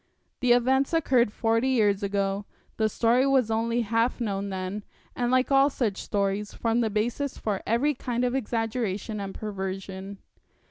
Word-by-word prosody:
The 250 -1 +4
events 265 +4 +2
occurred 255 -8 +3
forty 230 +3 +1
years 210 -6 +2
ago 200 0 -1 0.3
the 220 -1 +2
story 240 +5 +2
was 260 -5 +3
only 230 +2 +1
half 230 +3 0
known 200 -3 -2
then, 190 +2 -4 0.3
and 245 -1 0
like 255 +2 +2
all 275 +1 +5
such 225 -8 -2
stories 200 0 -2
formed 230 +1 +1
the 220 - 0
basis 240 +6 -2
for 205 -3 -2
every 250 +7 +2
kind 245 -2 -2
of 245 - 0
exaggeration 225 -4 -2
and 195 -1 -5
perversion.' 195 -1 -5
225 Hz, 155 wpm, -26 LUFS, 200-245 Hz, 0.3 s, all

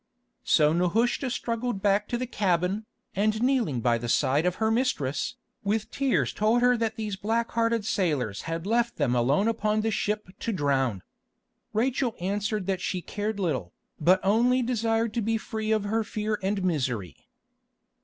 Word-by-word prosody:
So 150 0 +4
Nehushta 225 +10 +1
struggled 235 -2 -2
back 205 +1 +2
to 240 - -1
the 255 - -2
cabin, 195 -1 0 0.3
and 215 +2 +1
kneeling 240 - +1
by 120 0 +2
the 120 +1 -4
side 145 +8 +2
of 180 - 0
her 220 0 +1
mistress, 225 - 0 0.3
with 215 +2 -1
tears 275 -2 +1
told 225 +3 +2
her 250 0 +5
that 225 -2 -1
these 215 -3 -3
black 225 +4 -1
hearted 230 -2 +1
sailors 145 - 0
had 165 +1 -3
left 235 +2 +1
them 140 -5 +1
alone 135 - +2
upon 215 -1 +1
the 225 +1 0
ship 210 -1 -1
to 230 - -2
drown. 135 - 0 0.7
Rachel 245 +1 0
answered 205 +2 -1
that 190 -1 -1
she 180 -1 -2
cared 210 0 -3
little, 130 - -2 0.3
but 180 +5 +4
only 240 +6 +3
desired 230 -2 0
to 235 - 0
be 225 +1 +1
free 220 0 -3
of 215 -2 +2
her 220 +2 0
fear 215 0 -2
and 195 0 -1
misery. 125 - -2
210 Hz, 165 wpm, -27 LUFS, 175-230 Hz, 0.7 s, her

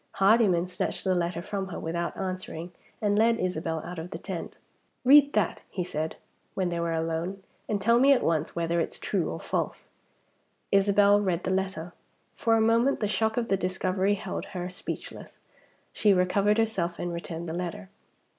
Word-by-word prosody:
Hardyman 195 -4 +4
snatched 180 - -3
the 190 - +2
letter 175 -1 -1
from 195 -1 -3
her, 190 - -6
without 170 +1 -3
answering, 185 -2 -5 0.3
and 205 0 +2
led 230 +1 +4
Isabel 165 -3 -2
out 175 -1 -6
of 165 +2 -6
the 165 - -5
tent. 180 -1 -6 0.5
"Read 285 +2 +7
that!" 210 -5 0
he 185 - -3
said, 160 -2 -3 0.4
when 185 -2 0
they 170 -1 -2
were 170 0 -1
alone. 165 +4 -2 0.3
"And 210 - 0
tell 230 +4 +4
me 275 +2 +6
at 270 - +4
once 160 -1 0
whether 170 0 0
it's 165 - -2
true - - -1
or - - -5
false." - - -3 0.8
Isabel 200 +1 +5
read 180 -3 0
the 190 - 0
letter. 185 -3 -2 0.4
For 225 -1 +2
a 225 - +3
moment 230 +5 +3
the 210 - 0
shock 220 +2 0
of 235 -1 -1
the 195 - +3
discovery 185 +2 0
held - - -5
her 180 -1 -5
speechless. - - -7 0.6
She 205 -2 +4
recovered 200 +3 +2
herself, 195 -7 0
and 175 0 -3
returned 170 0 -5
the 160 - -4
letter. 185 +3 -5
185 Hz, 180 wpm, -27 LUFS, 170-205 Hz, 0.8 s, Read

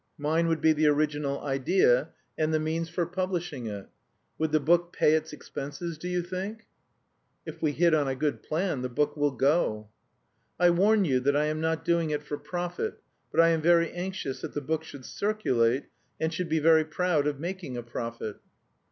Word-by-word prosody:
Mine 160 +3 +1
would 165 -1 0
be 160 - +5
the 155 0 +2
original 145 -1 +1
idea 135 0 +2 0.3
and 155 0 0
the 155 - +2
means 160 +2 -2
for 170 +1 -1
publishing 175 -7 -3
it. 100 -2 -6 0.5
Would 160 -1 0
the 155 - +4
book 170 +3 +2
pay 150 - +3
its 160 0 0
expenses, 150 +3 -6
do 180 - -5
you 180 -1 -1
think?" 195 +5 -5 0.8
"If - - -8
we 155 -2 +2
hit 170 +2 +3
on 150 -3 +3
a 135 - -1
good 150 +2 -1
plan 160 -4 -1
the 125 - -3
book 145 +4 0
will 145 -1 +2
go." 130 -6 +1 0.7
"I 175 0 +6
warn 200 +4 +4
you 130 -5 +2
that 140 +3 +1
I 150 - +2
am 155 +1 -2
not 160 0 -1
doing 170 -2 +2
it 150 -1 -2
for 145 -1 -5
profit; 175 - -4 0.3
but - - +4
I 165 - +5
am 165 -1 +2
very 170 0 +4
anxious 175 -6 -4
that - - -6
the - - 0
book 160 +3 -2
should 140 -5 -11
circulate 135 - +1 0.4
and 160 +1 -1
should 170 +1 -3
be 160 - +2
very 160 0 +5
proud 155 -1 0
of 145 -2 -2
making 175 -6 -5
a 120 - -4
profit." 115 -2 -5
155 Hz, 195 wpm, -28 LUFS, 145-175 Hz, 0.8 s, I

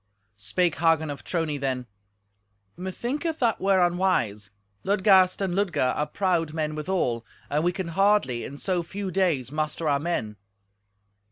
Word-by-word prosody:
Spake 170 - 0
Hagen 160 -2 +2
of 140 - -8
Trony 160 -4 -2
then, 130 -2 -2 0.9
"Methinketh 250 - -3
that 230 -4 +1
were 190 -2 +4
unwise. 175 - 0 0.3
Ludgast 190 -1 +4
and 190 -2 -1
Ludger 175 -10 +1
are 150 - -1
proud 165 -3 0
men 155 -1 -1
withal, 150 -7 -1 0.3
and 150 +2 +1
we 175 - +2
can 180 -1 -4
hardly 195 - +2
in 140 - -7
so 180 +2 -1
few 190 +3 -5
days 165 -9 +1
muster 155 +1 -2
our 140 -1 +2
men." 125 -10 -3
170 Hz, 145 wpm, -26 LUFS, 145-190 Hz, 0.9 s, were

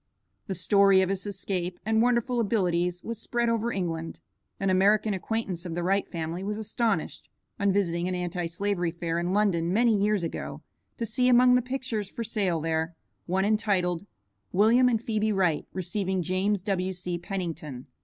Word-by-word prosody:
The 190 - -2
story 195 0 +5
of 185 - -1
his 195 +1 -2
escape 185 -3 -3
and 220 0 +3
wonderful 245 0 +2
abilities 180 -5 0
was 230 -1 -5
spread 235 0 0
over 230 0 0
England. 165 -4 -3 0.4
An 195 -1 +1
American 205 +3 +3
acquaintance 190 -2 -3
of 170 -3 -5
the 175 - -2
Wright 195 +2 +1
family 165 +1 -4
was 210 +1 -3
astonished, 220 +1 -2 0.3
on 200 -1 +3
visiting 175 -3 0
an 185 - -1
Anti 175 -1 -2
slavery 180 0 -1
fair 170 0 -2
in 175 +1 -1
London 185 -5 +2
many 230 +2 +4
years 205 -1 +1
ago, 165 - -5 0.3
to 230 - -2
see 250 +3 +1
among 250 0 +6
the 250 - +4
pictures 250 -5 -3
for 230 - -5
sale 195 -6 0
there, 160 +1 -1 0.3
one 190 +2 +1
entitled, 200 -4 +1 0.4
"William 230 +6 +5
and 230 -2 0
Phebe 215 -1 0
Wright 180 -6 +1
receiving 185 0 -2
James 185 +2 0
W.C. 185 -3 -2
Pennington." 165 -8 -5
195 Hz, 165 wpm, -27 LUFS, 175-215 Hz, 0.4 s, among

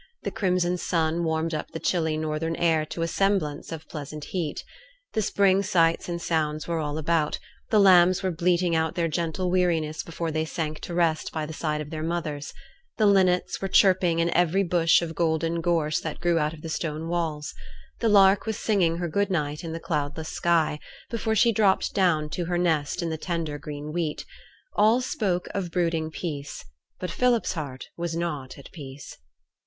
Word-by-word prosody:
The - - -2
crimson 180 -2 0
sun 165 -1 0
warmed 160 0 -1
up 155 - -3
the 160 - -6
chilly 160 -3 0
northern 155 +1 -2
air 160 -2 +2
to 165 - -3
a - - 0
semblance 175 -5 0
of 160 -1 -7
pleasant 150 -1 -7
heat. 165 -4 -3 0.5
The 220 - +1
spring 195 -1 +3
sights 170 -3 +2
and 170 0 -2
sounds 155 -3 -1
were 170 -1 -1
all 150 -1 -2
about; 160 -1 +1 0.3
the 215 - +4
lambs 185 -2 +6
were 185 - +1
bleating 175 +1 +1
out 160 0 0
their 170 -2 +1
gentle 170 +3 -1
weariness 165 -4 +1
before 165 0 -4
they 155 0 0
sank 155 -1 -3
to 175 - -6
rest 165 -3 +1
by 155 -1 -3
the 160 - -7
side 150 -1 -2
of 150 0 -8
their 155 -1 -4
mothers; 160 -3 -3 0.5
the 215 - +3
linnets 185 -3 +3
were 195 - -1
chirping 185 -3 +4
in 170 0 +1
every 175 +3 +3
bush 170 -1 +3
of 165 -1 -4
golden 165 +1 0
gorse 165 -3 +1
that 155 - -5
grew 170 -1 +2
out 150 +1 -1
of 150 - -15
the - - -5
stone 155 0 -3
walls; 160 -4 -2 0.5
the 230 - +2
lark 200 0 +5
was 220 - -1
singing 180 -6 +1
her 175 0 -2
good 200 +5 0
night 150 -4 -2
in 165 - -5
the 165 - -4
cloudless 150 -1 -3
sky, 165 -3 +1 0.3
before 225 -1 -1
she 230 +3 +5
dropped 200 -3 +2
down 170 -6 +2
to 175 +3 -3
her 175 +1 -1
nest 165 -1 0
in 165 - -2
the 160 - -4
tender 165 -4 -3
green 150 +1 -7
wheat; 165 -3 -2 0.5
all 220 +4 +5
spoke 205 -9 -1
of 190 -3 -2
brooding 165 -2 0
peace 145 -4 -6 0.3
but 180 - -4
Philip's 245 -5 +2
heart 140 -6 -6
was 170 -1 -3
not 150 -6 -4
at 140 - -13
peace. 140 -3 -9
165 Hz, 190 wpm, -26 LUFS, 155-180 Hz, 0.5 s, lambs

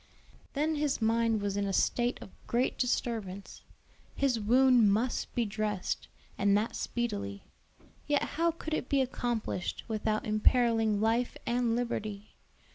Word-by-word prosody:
Then 305 +2 0
his 290 -2 0
mind 225 -1 +2
was 200 -1 -1
in 200 0 0
a - - -1
state 240 +5 +1
of - - -13 0.2
great 245 +2 +1
disturbance, 220 -6 -2 0.5
His 265 -4 +1
wound 240 0 +5
must 230 +5 -1
be 240 - +1
dressed, 210 -2 -2 0.3
and 200 0 +4
that 215 +2 -2
speedily; 100 - -3 0.6
yet 290 -1 +2
how 335 +2 0
could 320 -1 -5
it 280 - -2
be 280 - +3
accomplished 240 -7 -2
without 215 -1 -1
imperiling 220 0 +3
life 230 +3 +1
and 235 -1 +1
liberty? 215 -4 -3
230 Hz, 135 wpm, -30 LUFS, 210-250 Hz, 0.6 s, wound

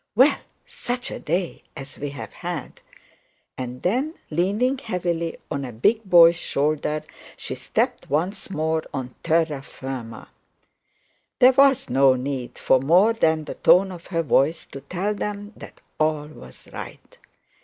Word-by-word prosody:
'Well, 260 +6 +5 0.3
such 255 - -4
a - - -5
day 170 +3 -2 0.2
as 135 -1 -9
we've 145 0 -4
had!' 170 0 -6 0.7
and 125 0 -6
then 260 - 0 0.2
leaning 205 - +1
heavily 175 -7 -2
on 140 - -2
a 125 - -5
big 215 - +2
boy's 170 -2 +7
shoulder, 150 0 -1 0.3
she - - -5
stepped - - -2
once 175 +10 -1
more 160 -2 0
on 130 -2 -5
terra 160 -4 +1
firma. 130 -4 -8 1.1
There 255 +1 +7
was 270 0 +4
no 135 -1 +4
need 130 -1 -4
for 130 - +3
more 180 - +4
than 160 -8 +1
the - - -6
tone 190 +2 +4
of 175 -2 -10
her 165 -2 -1
voice 155 +2 +2
to 135 - -8
tell 185 +8 -2
them 205 0 -5
that - - -12 0.2
all 155 -1 +1
was 65 - -13
right. - - -10
165 Hz, 145 wpm, -23 LUFS, 140-200 Hz, 1.1 s, boy's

